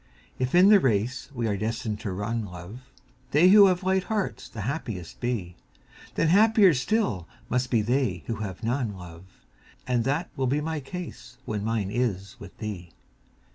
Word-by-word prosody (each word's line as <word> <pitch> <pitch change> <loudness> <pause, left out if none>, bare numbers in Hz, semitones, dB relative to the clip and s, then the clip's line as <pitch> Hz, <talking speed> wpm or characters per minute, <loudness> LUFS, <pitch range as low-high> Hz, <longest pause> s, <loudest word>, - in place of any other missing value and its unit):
If 130 +4 0
in 185 +3 +7
the 210 -1 +8
race 125 - 0
we 120 -4 -3
are 105 - 0
destined 110 0 -3
to 105 - -4
run, 110 +4 -2
love, 100 +6 -10 0.4
They 155 +7 +5
who 200 0 +9
have 185 0 +1
light 190 0 +1
hearts 215 -3 -3
the 110 - -7
happiest 110 - -5
be, 110 -8 -3 0.6
Then 165 - +2
happier 205 -1 +6
still 130 - 0 0.2
must 125 0 0
be 115 -4 +2
they 115 - 0
who 115 - -3
have 105 0 -6
none, 115 -3 -1
love. 90 0 -11 0.6
And 125 -2 +1
that 145 +6 -1
will 130 -1 0
be 140 +4 +1
my 160 0 -3
case 145 -6 -8
when 105 -2 -3
mine 110 -3 -1
is 100 -5 -2
with 100 -2 -12
thee. 90 -6 -6
120 Hz, 175 wpm, -26 LUFS, 105-150 Hz, 0.6 s, who